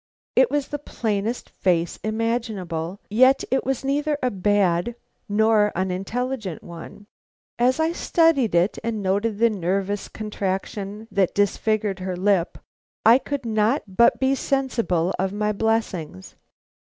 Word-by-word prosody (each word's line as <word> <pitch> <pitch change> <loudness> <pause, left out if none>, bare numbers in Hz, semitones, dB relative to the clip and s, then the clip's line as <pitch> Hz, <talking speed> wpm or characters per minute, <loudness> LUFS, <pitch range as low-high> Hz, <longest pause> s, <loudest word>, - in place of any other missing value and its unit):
It - - +5
was 290 -2 -1
the 290 - -4
plainest 220 -4 -3
face 175 -2 0
imaginable, 215 -6 -2
yet 260 +5 +5
it 265 - +2
was 270 0 -2
neither 290 +2 0
a 250 - +2
bad 200 +1 +1 0.3
nor 210 0 +3
unintelligent 195 +3 -3
one. 175 +4 -10 0.5
As 255 +4 +3
I 320 +1 +2
studied 325 - +2
it 175 +4 +2
and 220 -3 -2
noted 200 +3 0
the 230 +1 +3
nervous 195 +1 -2
contraction 205 0 -4
that 195 -3 +1
disfigured 205 0 0
her 185 0 -3
lip, 190 -2 +1 0.5
I 230 +3 +7
could 280 -2 -4
not 220 +4 +1
but 235 +2 +5
be 265 0 +2
sensible 230 -11 0
of 190 0 0
my 210 0 0
blessings. 200 - -2
210 Hz, 130 wpm, -23 LUFS, 190-245 Hz, 0.5 s, I